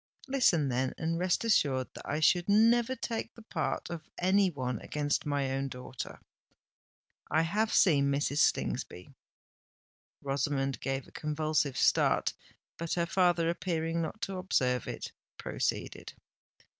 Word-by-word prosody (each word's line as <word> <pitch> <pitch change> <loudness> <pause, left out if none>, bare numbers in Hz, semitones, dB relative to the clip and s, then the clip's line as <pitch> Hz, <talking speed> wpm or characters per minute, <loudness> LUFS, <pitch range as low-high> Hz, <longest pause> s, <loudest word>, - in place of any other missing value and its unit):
Listen 195 - +3
then—and 130 +6 -1
rest 180 +3 +1
assured 135 - +2
that - - -9
I 150 +2 -1
should 175 +4 +3
never 230 +4 +4
take 230 -2 -4
the 230 - -13
part 170 -4 -3
of 165 -2 -7
any 190 +2 +3
one 125 - -3
against 150 0 -1
my 140 -2 0
own 135 +1 -1
daughter. 125 -1 -7 1.1
I 160 - +3
have 210 +6 0
seen 145 -7 +4
Mrs. 145 +1 0
Slingsby." 90 -10 0 1.1
Rosamond 135 -2 -1
gave 135 0 -3
a - - -17
convulsive 150 -3 -1
start; - - +3 0.5
but 170 0 -2
her 170 -1 +1
father, 175 -1 +2
appearing 165 -1 -1
not 165 +6 -4
to 195 -2 -3
observe 125 - 0
it, - - -5 0.3
proceeded. - - -3
160 Hz, 130 wpm, -30 LUFS, 135-185 Hz, 1.1 s, never